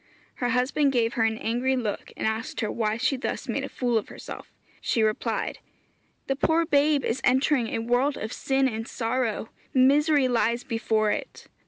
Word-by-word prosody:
Her 245 - 0
husband 255 +4 +2
gave 235 -2 +2
her 225 - +2
an 220 0 0
angry 245 +4 0
look, 225 -5 -3
and - - -2
asked 220 +3 -2
her 215 - -1
why 220 -1 -1
she 260 +3 +1
thus 255 - -4
made - - -2
a - - -4
fool 240 -3 0
of - - -10
herself. - - -9 0.3
She 230 - +1
replied, 215 0 -1 0.7
'The 270 - -1
poor 325 +3 +2
babe 290 -1 +3
is 245 +4 -1
entering 260 -1 +3
a - - -2
world 245 +5 +1
of 215 - -5
sin 270 0 +1
and 225 -2 -4
sorrow; 230 -2 -2 0.3
misery 285 +2 +4
lies 235 -1 +1
before 220 -2 0
it. - - -5
245 Hz, 180 wpm, -26 LUFS, 225-270 Hz, 0.7 s, misery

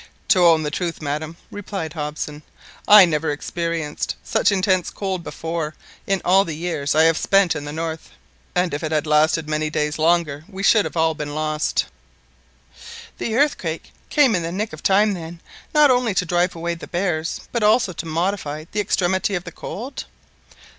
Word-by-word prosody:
"To 185 -3 +5
own 160 -2 +4
the 150 - -2
truth, 170 0 -3
madam," 150 +2 -4
replied 195 -6 -5
Hobson, 150 -1 -5 0.5
"I 210 -2 +10
never 160 -2 -1
experienced 165 0 -3
such - - +2
intense 185 -2 +1
cold 190 -3 -4
before, 165 -2 -4 0.3
in 195 -1 0
all 190 +2 +5
the 165 -5 -5
years 155 -4 -2
I 160 - +5
have 165 0 +3
spent 195 -3 +3
in 145 - -5
the 145 - -5
north; 160 +1 -5 0.5
and 180 -3 +1
if 145 - -3
it 155 - -3
had 155 -1 +1
lasted 155 +1 +2
many 155 0 -1
days 150 0 -2
longer 160 -3 +1
we 195 +1 -7
should 210 +1 +4
all 160 0 +3
have 155 - -10
been 145 -1 -4
lost." 155 0 0 1.3
"The 225 - -2
earthquake 230 - 0 0.2
came 285 -6 +4
in 180 - +1
the 165 0 -3
nick 205 +1 -3
of 155 - -9
time 205 +2 +3
then, 170 -1 -7 0.3
not 300 -3 +5
only 245 -5 +1
to 180 - +1
drive 175 +1 +1
away 170 +1 -2
the 170 - -9
bears, 170 -3 -2
but 235 - -1
also 210 -2 +3
to 165 - -6
modify 160 -2 -2
the 210 - -2
extremity 190 0 +1
of 175 - -3
the - - -8
cold?" 245 +7 -7
170 Hz, 180 wpm, -21 LUFS, 155-195 Hz, 1.3 s, I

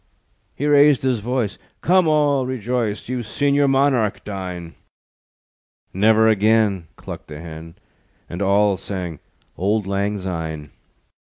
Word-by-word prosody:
He 145 - -3
raised 145 -2 +5
his 130 -3 +1
voice: 120 -2 -2 0.2
"Come, 180 0 +3
all 145 -4 +2
rejoice, 120 -3 -2
You've 125 -2 -4
seen 140 +6 0
your 140 0 +3
monarch 135 -6 +2
dine." 90 -4 -6 1.2
"Never 110 +3 +4
again," 105 -4 +2
Clucked - - -9
the 75 0 -9
Hen, 80 0 -10 0.5
And 85 +3 -6
all 100 0 +3
sang 90 -4 -5 0.4
Old 105 +3 +1
Lang 100 +1 -1
Syne. 80 -6 -5
105 Hz, 120 wpm, -21 LUFS, 95-130 Hz, 1.2 s, raised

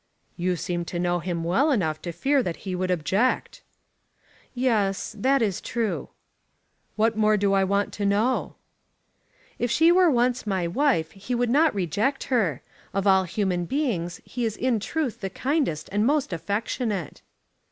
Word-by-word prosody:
"You 180 0 0
seem 175 0 -3
to 175 - -5
know 175 0 0
him 170 -1 -3
well 195 - +2
enough 160 - 0
to 175 - -4
fear 275 - +1
that 175 -8 -3
he 190 - -3
would 185 0 -2
object." 190 +8 0 0.9
"Yes; 220 -5 0
that 265 +3 +3
is 200 -5 -1
true." 230 -3 -2 0.9
"What 220 +1 +2
more 215 0 +3
do 200 -1 +2
I 195 0 +3
want 200 +1 0
to 205 - -3
know?" 215 +6 +1 1.0
"If 240 - 0
she 325 +8 +5
were 360 0 +5
once 245 -3 +1
my 190 -3 0
wife 175 - +1
he 200 +6 -4
would 240 -1 +1
not 300 -1 +4
reject 200 - 0
her. 180 - +1 0.3
Of 195 0 0
all 190 -1 +4
human 180 -2 -1
beings 195 - -2
he 245 - -4
is 220 -2 -1
in 250 -3 +1
truth 250 0 -3
the 195 - -2
kindest 265 - -1
and 205 +2 +1
most 280 -4 +1
affectionate." 205 - -3
205 Hz, 165 wpm, -25 LUFS, 180-250 Hz, 1.0 s, she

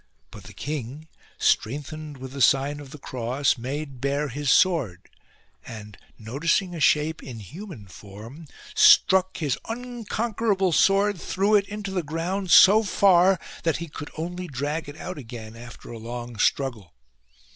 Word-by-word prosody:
But - - -12
the - - -12
king, 145 +1 -6 0.3
strengthened 150 +4 -1
with 130 0 -9
the 140 0 -6
sign 140 +4 +3
of 145 -2 -10
the 150 - -10
cross, 130 0 -1
made 135 +1 -6
bare 140 +1 -1
his 145 +2 -3
sword; 135 - +2 0.6
and, 105 -2 -10 0.2
noticing 155 - -1
a 170 - -6
shape 155 +1 +2
in 125 -4 -9
human 155 - -10
form, 105 - -12 0.3
struck 190 0 +5
his 145 -6 -1
unconquerable 225 -4 -1
sword 195 +2 +3
through 200 +3 0
it 200 -1 -1
into 205 -1 -5
the 190 -2 -1
ground 170 +5 -3
so 200 +5 +8
far, 190 -3 +4 0.2
that 165 -2 0
he 170 - -6
could 150 -1 -8
only 175 +3 -5
drag 145 +2 -3
it 145 - -10
out 185 -4 -7
again 115 -3 -9
after 120 +1 -11
a 115 - -8
long 120 0 -7
struggle. 115 - -1
150 Hz, 150 wpm, -25 LUFS, 125-185 Hz, 0.6 s, so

